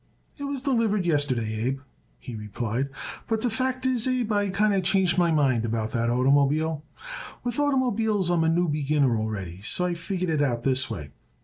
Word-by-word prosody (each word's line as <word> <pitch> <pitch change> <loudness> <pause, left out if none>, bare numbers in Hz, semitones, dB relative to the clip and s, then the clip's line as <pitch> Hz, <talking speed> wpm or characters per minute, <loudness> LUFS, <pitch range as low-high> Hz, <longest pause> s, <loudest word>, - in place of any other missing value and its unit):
"It 285 - -4
was 280 -2 -4
delivered 230 -8 +1
yesterday, 125 -9 0
Abe," 135 +1 -2 0.4
he 125 - -9
replied. 110 +4 -3 0.4
"But 220 -1 0
the 245 - 0
fact 255 +2 -1
is, 255 -2 +2
Abe, 250 -3 0
I 205 -1 +1
kinder 200 0 +2
changed 185 -1 +2
my 175 -1 +4
mind 135 -7 +2
about 110 -1 -2
that 115 -1 0
oitermobile. 140 +5 +2 0.6
With 245 -1 -2
oitermobiles 230 -9 +1
I - - +3
am 165 -2 +2
a 160 - +3
new 175 +2 +2
beginner 145 -4 +1
already, 100 -5 -4
so 180 - +1
I 180 - 0
figure 180 0 -2
it 150 - +1
out 120 -4 0
this 130 -1 +2
way. 75 -10 -6
160 Hz, 185 wpm, -26 LUFS, -, 0.6 s, my